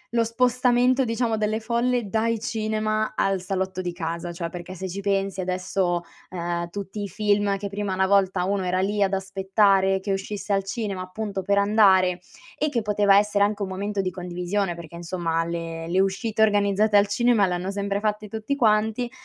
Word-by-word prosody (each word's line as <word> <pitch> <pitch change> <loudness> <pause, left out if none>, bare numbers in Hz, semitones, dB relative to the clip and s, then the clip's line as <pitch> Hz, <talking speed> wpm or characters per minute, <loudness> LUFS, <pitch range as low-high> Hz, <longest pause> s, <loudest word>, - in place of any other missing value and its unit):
lo 230 - +4
spostamento, 250 +2 +2
diciamo, 230 -1 0
delle 215 0 0
folle 235 0 0
dai 225 +2 0
cinema 215 -1 -1
al 195 -1 +1
salotto 190 0 -2
di 180 -1 -3
casa, 170 0 -4
cioè 170 0 -4
perché, 175 +1 -8
se 190 +1 -5
ci 195 +3 -5
pensi, 195 -1 -1
adesso, 180 -1 -1 0.3
ehm, 170 -1 -3
tutti 200 +2 -6
i 200 - -5
film 205 0 +1
che 200 +1 -5
prima 200 -1 -3
una 190 0 +1
volta 190 -2 +2
uno 195 0 0
era 180 0 0
lì 200 +2 +1
ad 195 - 0
aspettare 195 0 +2
che 195 +1 -2
uscisse 200 +1 -3
al 195 - +1
cinema, 195 -2 -4
appunto, 195 +1 -4
per 200 +2 +1
andare, 195 -3 +4 0.4
e 305 +1 0
che 240 -4 -1
poteva 205 -1 +4
essere 205 0 +3
anche 205 0 0
un - - -2
momento 200 +2 -3
di 185 -1 -2
condivisione, 180 +1 -2
perché 170 -1 -10
insomma 170 -1 -2
le 165 -1 -5
le 185 +2 +1
uscite 195 +3 0
organizzate 205 0 +2
al 200 - +4
cinema 225 0 +3
l'hanno 180 +1 -2
sempre 200 0 -2
fatte 210 0 -2
tutti 220 +6 -3
quanti; 220 0 +1
200 Hz, 185 wpm, -24 LUFS, 185-215 Hz, 0.4 s, lo